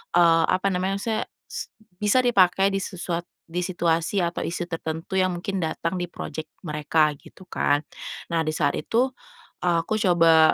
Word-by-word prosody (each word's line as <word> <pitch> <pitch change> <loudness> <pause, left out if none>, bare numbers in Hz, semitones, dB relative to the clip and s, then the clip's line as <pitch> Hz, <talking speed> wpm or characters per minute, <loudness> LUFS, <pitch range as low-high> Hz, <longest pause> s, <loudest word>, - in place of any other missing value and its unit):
eee, 165 -1 +6
apa 185 +2 +2
namanya 185 +1 0
maksudnya 220 +3 -1 0.3
s - - -5 0.3
bisa 210 +5 +3
dipakai 195 -4 +4
di 195 - 0
sesuat 175 -3 -4 0.2
di 175 +1 -1
situasi 170 +1 +1
atau 170 0 -1
isu 175 +1 -3
tertentu 165 +2 -3
yang 185 -1 +2
mungkin 185 +3 -3
datang 165 +1 -2
di 180 - -1
project 155 -2 -7
mereka, 150 -1 +2
gitu 185 +5 -16
kan. 145 0 +2 0.5
Nah 165 -1 +1
di 155 - -1
saat 145 - +1
itu, 235 +11 +1 0.6
eee, 170 -2 +3
aku 215 +6 -1
coba 165 -5 +5
175 Hz, 165 wpm, -25 LUFS, 165-190 Hz, 0.6 s, eee